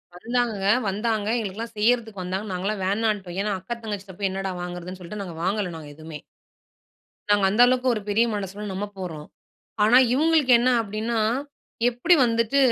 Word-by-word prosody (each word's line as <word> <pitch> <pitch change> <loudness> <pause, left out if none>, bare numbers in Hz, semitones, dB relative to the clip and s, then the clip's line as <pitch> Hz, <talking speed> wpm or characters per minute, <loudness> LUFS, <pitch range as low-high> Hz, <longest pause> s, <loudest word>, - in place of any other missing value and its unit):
வந்தாங்க, 235 +4 -1 0.3
வந்தாங்க 210 +1 -1
எங்களுக்கெல்லாம் 225 +2 -5
செய்யறதுக்கு 220 -2 +1
வந்தாங்க, 190 +4 -3
நாங்கலாம் 195 +2 -2
வேணான்ட்டோம். 200 -3 -1
ஏன்னா 210 +1 -1
அக்கா 235 +6 -5
தங்கச்சிட்ட 200 -3 -6
போய் 200 -1 0
என்னடா 195 0 -3
வாங்குறதுன்னு 180 +1 -6
சொல்லிட்டு 200 +4 -7
நாங்க 175 -4 -8
வாங்கலை. 195 0 0
நாங்க 155 -2 -10
எதுமே. 155 0 -9 1.1
நாங்க 205 -1 +4
அந்த 210 +5 +3
அளவுக்கு 255 0 +1
ஒரு 215 - -3
பெரிய 220 +3 +3
மனசுல 205 +1 -5
நம்ம 195 +2 -3
போறோம். 160 -5 -6 0.6
ஆனா 225 +4 +5 0.2
இவுங்களுக்கு 305 -2 +3
என்ன 250 +1 +3
அப்படின்னா 220 +2 -2 0.7
எப்படி 245 +9 +3
வந்துட்டு 230 +2 +1
205 Hz, 150 wpm, -24 LUFS, 190-230 Hz, 1.1 s, ஆனா